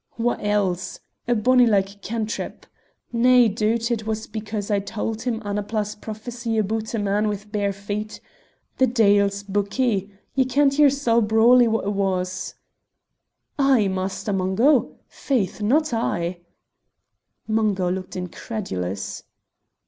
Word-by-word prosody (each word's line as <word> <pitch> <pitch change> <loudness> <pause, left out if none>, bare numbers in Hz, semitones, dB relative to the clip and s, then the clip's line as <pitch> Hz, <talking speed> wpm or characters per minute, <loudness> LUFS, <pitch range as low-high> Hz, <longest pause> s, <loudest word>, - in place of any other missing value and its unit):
"Wha 240 +1 +1
else? 190 -3 -1 0.3
A 240 - +2
bonny 250 +3 +4
like 200 -1 +1
cantrip! 220 +2 -4 0.5
Nae 245 +1 +5
doot 225 +3 0
it 220 -2 -2
was 220 0 -2
because 210 -1 -5
I 205 - +3
tauld 220 +2 -4
him 235 -2 -2
Annapla's 210 0 -2
prophecy 225 +2 -5
aboot 220 +2 -1
a - - 0
man 205 +1 +1
with 205 -1 -3
the - - -24
bare 205 -1 0
feet. 205 +2 -5 0.6
The 260 - +5
deil's 200 -4 +3
buckie! 205 +1 0 0.2
Ye 265 -1 +2
kent 275 +2 +2
yersel' 275 -5 +4
brawly 230 +3 +5
wha 225 0 +1
it 205 +1 -2
was." 185 -2 -2 1.0
"I, 265 -7 +4
Master 190 +2 -3
Mungo! 195 +9 +2
Faith, 225 -7 -2
not 285 +7 +2
I!" 175 -6 -1 1.1
Mungo 210 -5 +1
looked 185 0 -5
incredulous. 175 - -4
215 Hz, 125 wpm, -23 LUFS, 200-235 Hz, 1.1 s, Nae